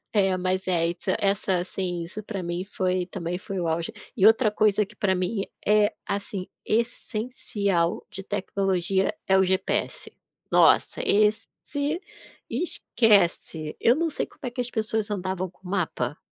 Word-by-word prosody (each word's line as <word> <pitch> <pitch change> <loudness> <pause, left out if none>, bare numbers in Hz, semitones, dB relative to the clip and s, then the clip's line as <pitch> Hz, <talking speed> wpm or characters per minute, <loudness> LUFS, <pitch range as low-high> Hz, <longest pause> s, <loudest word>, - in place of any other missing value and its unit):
É 195 -3 +3
mas 185 +1 -1
é 170 -2 +2
essa 180 +2 -2
essa 195 -2 +2
assim, 175 -1 -3
isso 200 +5 -7
para 200 -3 -5
mim 175 +2 -3
foi, 185 -2 -1
também 180 -2 -4
foi 195 -2 -5
o 170 - -1
auge. 165 +6 -1 0.2
E 200 0 +5
outra 225 0 +5
coisa 210 -1 +2
que - - -18
para 190 -2 +1
mim, 190 +3 -1 0.2
eh, 210 0 +4
assim, 200 -2 -3 0.2
essencial 215 -5 -1
de 195 -2 -4
tecnologia, 195 -1 0
é 190 - +4
o - - +5
GPS. 185 0 0 0.4
Nossa, - - +4
esse 210 - +3 1.0
esquece. 190 - +1
Eu 235 - +5
não 330 +3 0
sei 305 - -2
como - - -24
é 250 - -1
que 250 +1 -4
as 245 0 -1
pessoas 215 -1 -1
andavam 185 -2 -2
com 185 0 -15
mapa. 160 -8 -1
195 Hz, 155 wpm, -26 LUFS, 180-215 Hz, 1.0 s, E